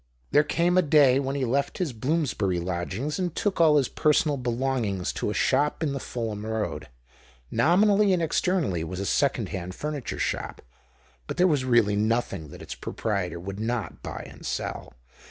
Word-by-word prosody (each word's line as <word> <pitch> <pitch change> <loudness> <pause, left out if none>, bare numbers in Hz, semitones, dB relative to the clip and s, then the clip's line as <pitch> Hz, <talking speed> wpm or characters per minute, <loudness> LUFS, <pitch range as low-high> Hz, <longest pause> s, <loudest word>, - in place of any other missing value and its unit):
There 145 - +6
came 175 +4 +2
a - - +6
day 140 -5 +5
when 135 0 -2
he 135 -2 0
left 140 +4 0
his 170 -8 -2
Bloomsbury 120 - 0
lodgings 95 - -3
and 180 -3 -2
took 195 -4 0
all 155 -2 +6
his 135 -4 +2
personal 150 -1 +2
belongings 120 -6 -1
to - - -2
a - - -1
shop 150 +3 +1
in 145 -3 0
the 140 - -3
Fulham 110 -5 -4
Road. 110 -1 -3 0.6
Nominally 200 - +4
and 180 - +3
externally 165 - 0
it 80 - -4
was 90 +1 -5
a 100 - -2
second 130 -4 +1
hand 90 -1 -5
furniture 150 -4 -4
shop, - - -3 0.6
but - - -5
there 180 - +5
was 145 -7 +2
really 120 -5 +3
nothing 105 -6 0
that - - -11
its - - -6
proprietor 100 -5 -3
would 100 +3 -6
not 115 -4 -3
buy - - -6
and - - -13
sell. - - -4
130 Hz, 180 wpm, -26 LUFS, 105-150 Hz, 0.6 s, There